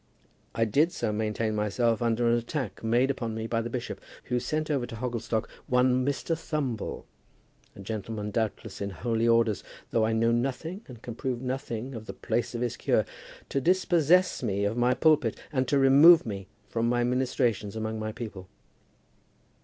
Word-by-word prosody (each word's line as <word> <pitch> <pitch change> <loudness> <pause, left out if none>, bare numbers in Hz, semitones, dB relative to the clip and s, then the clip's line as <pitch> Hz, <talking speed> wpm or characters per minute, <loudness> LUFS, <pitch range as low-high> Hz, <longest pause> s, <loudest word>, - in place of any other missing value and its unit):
I 115 - +2
did 145 +10 +3
so 110 -8 -2
maintain 110 +1 -1
myself 105 +2 +1
against 115 0 +1
an 120 - +3
attack 120 - -3
made 120 +4 +3
upon 115 -4 -4
me 110 0 -3
by 115 0 0
the 120 - -4
bishop, 125 0 -5 0.2
who 125 -1 -1
sent 155 +5 -2
over 130 -4 0
to - - -8
Hogglestock 115 -2 -2 0.2
one 125 0 +3
Mr. 145 +4 -1
Thumble, 150 -8 -3 0.7
a - - -10
gentleman 105 0 -4
doubtless 110 -2 -3
in 100 - -2
holy 115 +6 -1
orders, 115 -3 +3 0.3
though 115 - +2
I 110 +1 +1
know 115 +1 +3
nothing 135 - -2
and 120 -3 -12
can 120 - -6
learn 130 -1 -2
nothing 130 -1 -4
of 110 -2 -8
the - - -5
place 120 0 -2
of 120 - -3
his 120 -2 -2
cure, - - +2 0.4
to 135 - 0
dispossess 180 +1 +3
me 100 0 0
of 105 +2 0
my 120 +1 +2
pulpit 150 -8 +3
and 130 -2 +1
to 140 - +2
remove 145 +5 +7
me 100 -4 -5 0.2
from 115 0 0
my 120 0 +2
ministrations 120 -4 0
among 110 0 -3
my 110 0 -3
people. 105 -5 -8
120 Hz, 175 wpm, -28 LUFS, 110-130 Hz, 0.7 s, remove